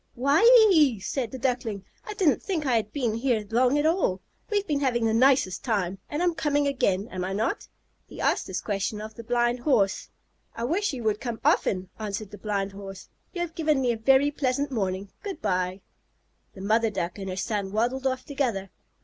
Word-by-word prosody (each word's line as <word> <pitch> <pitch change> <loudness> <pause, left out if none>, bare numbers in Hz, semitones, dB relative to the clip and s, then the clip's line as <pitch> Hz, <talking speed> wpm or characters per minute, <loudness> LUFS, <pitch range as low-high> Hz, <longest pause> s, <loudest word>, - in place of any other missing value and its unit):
"Why 280 +8 +3 0.3
ee!" 285 - +4
said 240 +4 -3
the 260 - -7
Duckling. 235 -6 -2 0.2
"I 425 - -6
didn't 365 -9 +2
think 340 -6 -2
I 255 -3 +2
had 215 -2 0
been 245 -7 -1
here 230 -2 0
long 250 +4 +3
at 295 - +1
all. 320 - +1 0.3
We've 410 -2 0
been 295 -5 0
having 240 -4 +1
the 220 - +2
nicest 245 -6 +3
time. 195 -6 -1
And 300 +4 -1
I'm 350 -1 +2
coming 290 -2 +1
again, 210 -8 0
am 185 -1 -4
I 190 +1 -3
not?" 225 - -2 0.4
He - - -11
asked - - +1
this - - -3
question 205 +1 -2
of 215 +1 -7
the 230 - -10
Blind 240 +1 +1
Horse. 240 -8 +1 0.5
"I 230 - -4
wish 355 - 0
you 255 -4 -6
would 215 -1 0
come 235 -3 -4
often," 185 -1 +2
answered 210 -1 -4
the 205 - -10
Blind 200 -2 -2
Horse. 195 -1 -10 0.2
"You 350 - -3
have 345 -2 -3
given 310 -4 +1
me 250 -2 +2
a - - -1
very 270 +5 +4
pleasant 280 0 -1
morning. 195 -4 -2
Good 400 -2 -6
bye!" 185 -1 -1 0.7
The 190 - -9
mother 220 +3 +2
Duck 185 -2 -4
and 195 -1 -5
her 185 - -4
son 200 -1 -2
waddled 245 +5 0
off 260 -1 -2
together. 240 - -2
235 Hz, 205 wpm, -26 LUFS, 200-280 Hz, 0.7 s, ee